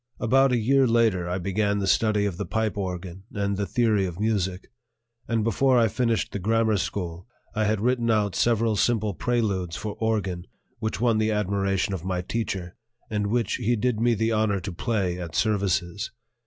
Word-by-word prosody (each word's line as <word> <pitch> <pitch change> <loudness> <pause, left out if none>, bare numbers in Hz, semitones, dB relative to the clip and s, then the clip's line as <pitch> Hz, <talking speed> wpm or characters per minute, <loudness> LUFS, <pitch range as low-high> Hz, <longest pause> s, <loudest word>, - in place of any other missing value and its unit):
About 135 +3 +4
a 125 - +3
year 135 +4 +3
later 110 -7 +2
I 90 - -1
began 100 +3 0
the 100 - -1
study 105 +1 +2
of 95 -4 -2
the - - -3
pipe 110 -1 -1
organ 95 -1 -5
and 100 0 0
the 100 0 -2
theory 110 -5 +2
of 90 0 -7
music; 100 -4 -1 0.6
and 115 -2 0
before 125 +4 +3
I 115 -2 +4
finished 115 -6 0
the 100 - -4
grammar 110 +2 +2
school, 90 -1 -4 0.3
I 110 -2 0
had 105 0 +1
written 120 0 +1
out 105 -3 +1
several 115 -2 +2
simple 110 -2 +1
preludes 95 -3 -1
for 105 -2 -4
organ 100 -6 -1 0.3
which 110 - -3
won 115 -2 +2
the 110 0 +2
admiration 100 -2 0
of 90 -4 -4
my 90 -1 -2
teacher, 95 -4 -3 0.4
and 105 -1 0
which 115 +2 0
he 120 +3 +1
did 120 0 0
me 120 0 +3
the 110 +2 0
honor 110 -2 +1
to 95 +2 -5
play 95 -3 -1
at 85 -2 -6
services. 100 -3 0
105 Hz, 185 wpm, -25 LUFS, 95-115 Hz, 0.6 s, About